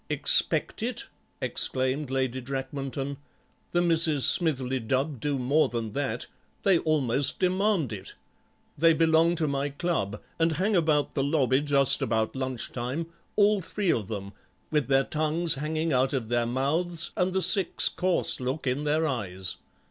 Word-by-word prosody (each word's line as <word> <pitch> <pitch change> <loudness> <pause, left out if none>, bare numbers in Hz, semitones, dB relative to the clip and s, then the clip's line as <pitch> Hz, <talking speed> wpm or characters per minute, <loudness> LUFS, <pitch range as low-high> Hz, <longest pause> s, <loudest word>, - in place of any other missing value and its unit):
"Expect - - +3
it!" - - -3 0.3
exclaimed 130 +2 0
Lady 130 -1 -2
Drakmanton; 135 +1 -5 0.5
"the 175 0 +1
Misses 160 -4 +3
Smithly 135 -6 +1
Dubb 130 +4 -2
do 145 +3 -1
more 140 +5 +1
than 115 -2 -4
that; 140 +3 -3 0.4
they 190 -4 +4
almost 140 -4 +2
demand 185 - 0
it. 95 - -9 0.6
They 165 +2 +4
belong 165 +1 +3
to 160 -2 -1
my 140 0 -2
club, 140 - -3 0.2
and 165 0 +2
hang 195 +7 0
about 155 -4 +1
the 135 - -1
lobby 140 -3 +1
just 140 -2 +3
about 110 +1 -1
lunch 130 -2 -3
time, 135 +8 -5 0.2
all 205 -1 +3
three 190 +1 -1
of 105 -5 -2
them, 100 -2 -6 0.4
with 150 -2 0
their 135 0 +3
tongues 155 +2 0
hanging 155 +2 -2
out 130 +2 +1
of 120 -5 -3
their 120 -1 0
mouths 160 +7 -2
and 180 +1 0
the 190 +1 0
six 195 -5 +6
course 185 -1 +1
look 130 +4 -4
in 135 +3 -1
their 155 +2 +1
eyes. 95 - -4
145 Hz, 155 wpm, -26 LUFS, 130-165 Hz, 0.6 s, six